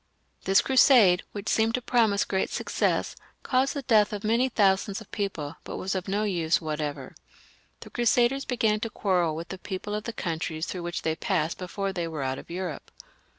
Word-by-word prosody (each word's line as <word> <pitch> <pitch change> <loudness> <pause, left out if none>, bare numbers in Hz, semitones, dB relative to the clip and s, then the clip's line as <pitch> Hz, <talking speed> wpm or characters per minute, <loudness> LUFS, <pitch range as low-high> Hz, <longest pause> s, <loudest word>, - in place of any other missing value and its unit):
This 195 +1 +5
Crusade, 245 -9 +5
which 205 0 -7
seemed 225 +1 +2
to - - 0
promise 225 -5 +2
great 190 -1 -1
success, - - -1 0.3
caused 265 +2 +1
the 280 - -3
death 220 -4 +4
of 205 0 -5
many 230 +4 +2
thousands 195 -3 +2
of 220 - -14
people, 165 -7 -4
but - - -6
was 190 - -2
of 190 0 -3
no 200 +2 0
use 170 -6 +1
whatever. 150 -4 -4 0.7
The - - -11
Crusaders 240 +3 +2
began 220 -5 +1
to 225 - -3
quarrel 180 -7 0
with 165 +1 -6
the 190 - -6
people 195 +2 -5
of 210 0 -3
the 235 - -3
countries 160 -3 -3
through 180 - -5
which 175 0 -4
they 160 -1 0
passed 170 -4 -1
before 195 +2 -3
they 175 -2 -2
were 155 -4 -4
out 130 0 -2
of - - -13
Europe. 180 -1 -5
195 Hz, 195 wpm, -27 LUFS, 170-220 Hz, 0.7 s, This